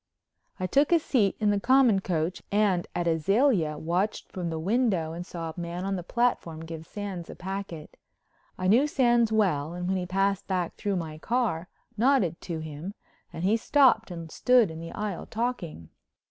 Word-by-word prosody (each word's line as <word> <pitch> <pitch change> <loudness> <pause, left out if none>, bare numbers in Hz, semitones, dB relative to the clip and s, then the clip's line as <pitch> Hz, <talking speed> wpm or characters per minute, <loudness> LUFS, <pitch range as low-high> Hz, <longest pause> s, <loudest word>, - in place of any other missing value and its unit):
I 185 - -1
took 280 - +2
a 340 - +7
seat 240 - +1
in 210 -1 +3
the 205 - +1
common 255 -3 +4
coach 175 -1 -2
and 200 -4 +2
at 175 -1 -1
Azalea 170 - +2
watched 175 +7 -2
from 180 -2 -3
the 160 - -3
window 185 -3 +1
and 170 +1 -5
saw 165 -2 -6
a 160 - -10
man 175 +2 -4
on 195 0 -1
the 180 - -3
platform 175 -6 -1
give 160 -1 -8
Sands 195 -5 -6
a - - -8
packet. 190 -4 -6 0.6
I 185 - -3
knew 240 +9 +5
Sands 240 -5 +3
well 175 -8 +1
and 180 0 -4
when 190 +1 +1
he 180 -1 -3
passed 195 +1 0
back 180 -3 -1
through 205 -2 -2
my 160 -3 -4
car 210 -6 -1 0.3
nodded 225 - +2
to 170 -3 -4
him 155 +6 -7 0.4
and 165 - -6
he 200 +4 +3
stopped 240 -2 +4
and 165 -2 -7
stood 245 -7 +4
in 160 - -8
the 165 0 -7
aisle 210 -4 -4
talking. 215 - -4
190 Hz, 185 wpm, -27 LUFS, 165-220 Hz, 0.6 s, a